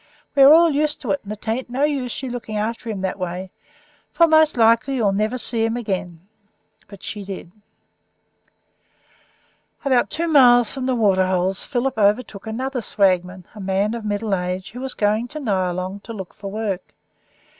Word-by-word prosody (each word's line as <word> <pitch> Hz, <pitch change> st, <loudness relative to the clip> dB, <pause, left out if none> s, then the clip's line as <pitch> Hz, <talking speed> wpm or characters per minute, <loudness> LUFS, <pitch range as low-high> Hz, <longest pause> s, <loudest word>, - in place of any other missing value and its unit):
We 280 Hz, -, +3 dB
are 270 Hz, +1 st, +9 dB
all 330 Hz, +1 st, +6 dB
used 300 Hz, +1 st, 0 dB
to 240 Hz, -8 st, -2 dB
it; 190 Hz, -, 0 dB
and 205 Hz, -, -8 dB
it 215 Hz, +1 st, -8 dB
ain't 240 Hz, +3 st, -2 dB
no 260 Hz, +3 st, -1 dB
use 275 Hz, -5 st, -1 dB
of -, -, -7 dB
your 260 Hz, -, -4 dB
looking 225 Hz, -3 st, -5 dB
after 230 Hz, +2 st, -3 dB
him 205 Hz, -4 st, -4 dB
that 190 Hz, +1 st, -3 dB
way, 180 Hz, +1 st, -5 dB, 0.6 s
for 335 Hz, -, +5 dB
most 315 Hz, -3 st, +4 dB
likely 230 Hz, +4 st, +3 dB
you'll 215 Hz, -6 st, +2 dB
never 215 Hz, +5 st, 0 dB
see 230 Hz, -2 st, +1 dB
him 225 Hz, +1 st, 0 dB
again." 185 Hz, -6 st, -4 dB, 0.6 s
But 200 Hz, -, -13 dB
she 205 Hz, -2 st, -6 dB
did. 190 Hz, -3 st, -8 dB, 2.3 s
About 260 Hz, -3 st, +2 dB
two 335 Hz, +2 st, -1 dB
miles 245 Hz, -6 st, +6 dB
from 260 Hz, -2 st, -4 dB
the 260 Hz, -, +1 dB
Waterholes 190 Hz, -3 st, +1 dB
Philip 250 Hz, -2 st, -2 dB
overtook 210 Hz, 0 st, +1 dB
another 255 Hz, +3 st, -3 dB
swagman, 185 Hz, -3 st, 0 dB
a 210 Hz, -, -11 dB
man 195 Hz, +2 st, 0 dB
of 235 Hz, -2 st, -5 dB
middle 210 Hz, 0 st, -2 dB
age, 180 Hz, 0 st, -3 dB
who 245 Hz, -, -9 dB
was 265 Hz, -1 st, -4 dB
going 215 Hz, +3 st, +1 dB
to 305 Hz, +4 st, -7 dB
Nyalong 185 Hz, -5 st, -2 dB
to 230 Hz, -, -9 dB
look 190 Hz, -4 st, -8 dB
for 200 Hz, -2 st, -8 dB
work. 205 Hz, -2 st, -4 dB
220 Hz, 180 wpm, -21 LUFS, 195-255 Hz, 2.3 s, are